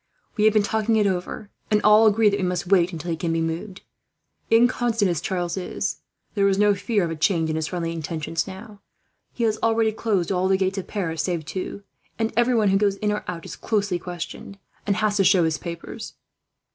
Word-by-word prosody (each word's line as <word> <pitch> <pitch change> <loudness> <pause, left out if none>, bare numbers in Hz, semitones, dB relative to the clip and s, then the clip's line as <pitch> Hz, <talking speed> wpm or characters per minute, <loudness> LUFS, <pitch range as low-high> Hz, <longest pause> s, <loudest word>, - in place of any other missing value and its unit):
"We 210 - +2
have 215 - +5
been 210 - +4
talking 220 +1 +1
it 215 -1 +3
over, 190 +2 -3 0.2
and 210 - +3
all 210 +1 +7
agree 215 +1 +4
that 200 0 -1
we - - -1
must 180 -1 -2
wait 180 -2 +4
until 170 0 -5
he - - 0
can 165 0 -2
be 165 - 0
moved. 165 +5 -4 0.7
Inconstant 230 -3 +3
as 170 - -2
Charles 175 -1 -2
is, 190 +2 -3 0.4
there 200 - +1
can 195 - +2
be - - -3
no 210 0 +5
fear 205 +1 0
of 165 - -2
a - - -3
change 160 0 +1
in - - -2
his 160 0 -1
friendly 170 -2 -3
intentions 165 +1 -3
now. 200 +2 -10 0.5
He 235 - -4
has 220 -1 +1
already 225 -1 +2
closed 205 -5 -1
all 185 0 +1
the 190 0 +3
gates 190 +1 0
of 190 - -7
Paris 165 -6 -2
save 170 -4 -2
two, 190 +4 -5 0.3
and 225 0 -1
everyone 235 -3 +3
who 195 - +4
goes 200 -1 +2
in 210 +1 -1
or 210 - -2
out 170 -2 -5
is - - -7
closely 200 -5 -1
questioned, 175 +3 -7 0.3
and 200 - +2
has 210 0 +1
to 195 - +4
show 185 -1 +5
his 160 -1 0
papers." 170 +6 -7
195 Hz, 220 wpm, -23 LUFS, 175-215 Hz, 0.7 s, all